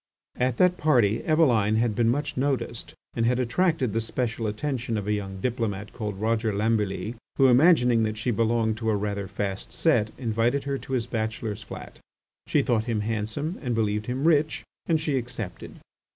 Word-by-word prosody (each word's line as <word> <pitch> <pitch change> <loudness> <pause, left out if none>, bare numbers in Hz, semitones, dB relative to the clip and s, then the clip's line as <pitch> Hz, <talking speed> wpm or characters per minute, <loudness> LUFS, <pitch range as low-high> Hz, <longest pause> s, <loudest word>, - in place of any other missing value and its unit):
At 125 -1 0
that 180 0 +4
party 120 -8 +3
Eveline 120 -10 +3
had 115 0 +2
been 115 +1 +2
much 145 +3 -1
noticed 130 -3 -2 0.2
and 115 - -1
had 125 +1 +2
attracted 130 - +1
the 115 - +1
special 115 0 -2
attention 115 +1 -2
of 105 - -3
a 105 - 0
young 95 -2 -4
diplomat 110 -3 -2
called 105 -4 -4
Roger 110 0 +1
Lambilly 105 -1 0 0.2
who, 135 - +5
imagining 125 -3 +5
that 110 -1 -1
she 120 +3 -1
belonged 115 0 +1
to 110 -1 -1
a 110 - +2
rather 100 -1 -2
fast 100 -1 -4
set, 120 -10 +2
invited 120 +2 0
her 140 -1 -2
to 135 - -7
his 120 -3 0
bachelor's 110 -2 -3
flat. 110 - -10 0.5
She - - +2
thought 110 -3 +1
him 115 -3 -1
handsome 115 - -3
and 125 -5 -1
believed 105 -1 0
him 130 +5 0
rich, 155 -2 +2 0.2
and 160 -2 +3
she 150 -3 0
accepted. 115 -5 -6
115 Hz, 180 wpm, -26 LUFS, 110-130 Hz, 0.5 s, who